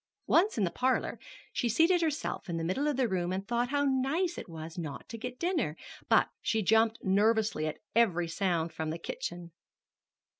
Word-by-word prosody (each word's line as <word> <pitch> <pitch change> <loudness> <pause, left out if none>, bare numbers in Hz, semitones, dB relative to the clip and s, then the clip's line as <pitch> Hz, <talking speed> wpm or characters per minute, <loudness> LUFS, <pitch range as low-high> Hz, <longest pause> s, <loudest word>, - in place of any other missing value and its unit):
Once 375 - +3
in 210 - +2
the 175 - +1
parlor, 255 +8 0 0.3
she 240 - 0
seated 335 - +4
herself 310 - -2
in 170 - -2
the 165 - -2
middle 225 - 0
of 295 -3 0
the 260 -2 +2
room 180 -3 -1
and 190 +1 -3
thought 240 +1 0
how 285 0 +1
nice 280 +7 +1
it - - -8
was 160 0 -8
not 155 -5 -6
to 230 - -7
get 250 +2 -6
dinner; 310 - -1 0.3
but - - +5
she 220 -1 0
jumped 225 +3 +4
nervously 210 -3 +2
at 155 - -4 0.2
every 180 -7 +3
sound 165 -1 -1
from 160 -1 -3
the 160 - -3
kitchen. 170 0 -6
220 Hz, 190 wpm, -30 LUFS, 170-265 Hz, 0.3 s, but